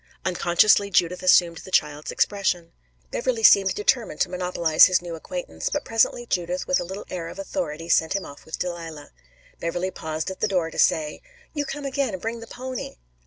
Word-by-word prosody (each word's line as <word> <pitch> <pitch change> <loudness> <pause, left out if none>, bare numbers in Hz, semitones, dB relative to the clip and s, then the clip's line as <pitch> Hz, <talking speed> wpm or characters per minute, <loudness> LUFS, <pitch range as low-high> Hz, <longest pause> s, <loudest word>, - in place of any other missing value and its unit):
Unconsciously 185 +3 +3
Judith 180 -1 +1
assumed 175 -2 +4
the - - -11
child's 150 -4 0
expression. 180 -4 0 0.4
Beverley 235 -3 -1
seemed 195 -2 +6
determined 215 -4 0
to - - +2
monopolize 180 -3 +4
his 185 -1 +3
new 175 -1 -7
acquaintance, 160 - -5
but - - -3
presently 225 +1 +1
Judith 180 -3 -2
with 275 - +2
a - - -2
little 190 +3 -7
air 170 -2 -4
of - - -9
authority 165 -5 -4
sent 160 -1 +3
him 200 -1 -2
off 145 - -12
with 160 - -6
Delilah. 165 -4 -6 0.5
Beverley 175 +3 -2
paused 160 +1 -4
at 190 - -9
the - - +2
door 175 -4 0
to - - -7
say: 155 -1 +2 0.3
"You 290 -2 -2
come 285 +1 -6
again 275 -4 -1
and 185 - -4
bring 225 +4 -4
the 230 - -10
pony." 255 +1 -6
180 Hz, 190 wpm, -24 LUFS, 165-205 Hz, 0.5 s, seemed